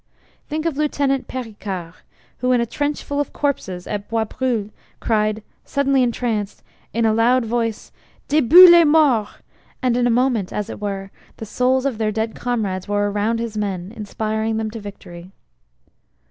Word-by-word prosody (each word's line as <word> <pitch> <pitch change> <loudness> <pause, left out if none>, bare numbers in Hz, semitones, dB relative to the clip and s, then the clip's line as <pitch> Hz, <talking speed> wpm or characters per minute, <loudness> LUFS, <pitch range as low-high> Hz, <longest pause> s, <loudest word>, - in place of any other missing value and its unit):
Think 310 +1 -3
of 320 -4 -1
Lieutenant 280 -3 0
Pericard 205 -8 -6 0.5
who 250 +1 +1
in 245 - +3
a 235 - +1
trench 290 +5 -3
full 285 0 -3
of 290 - -2
corpses 190 -11 -2
at 205 -1 -5
Bois 225 -1 0
brule 225 -3 -2 0.3
cried, 215 -1 0 0.2
suddenly 275 -1 +1
entranced, 230 -4 -2 0.3
in 230 0 0
a 220 - +3
loud 235 +2 +3
voice, 230 -1 -2 0.4
"Debout 310 +5 +8
les 345 -1 +8
morts!" 295 -9 +3 0.5
and 250 -3 +1
in 245 0 +2
a - - +2
moment, 240 -5 +1
as 210 - -4
it - - -8
were, 195 -1 -4 0.3
the 220 - -7
souls 255 +4 +1
of 255 -6 -2
their 215 -1 0
dead 220 +1 -2
comrades 205 -7 -3
were 205 0 0
around 210 +3 0
his 230 -2 -4
men, 195 -3 -3
inspiring 220 +1 -2
them 220 -1 -2
to 225 - -7
victory. 185 -4 -10
225 Hz, 165 wpm, -20 LUFS, 210-260 Hz, 0.5 s, Debout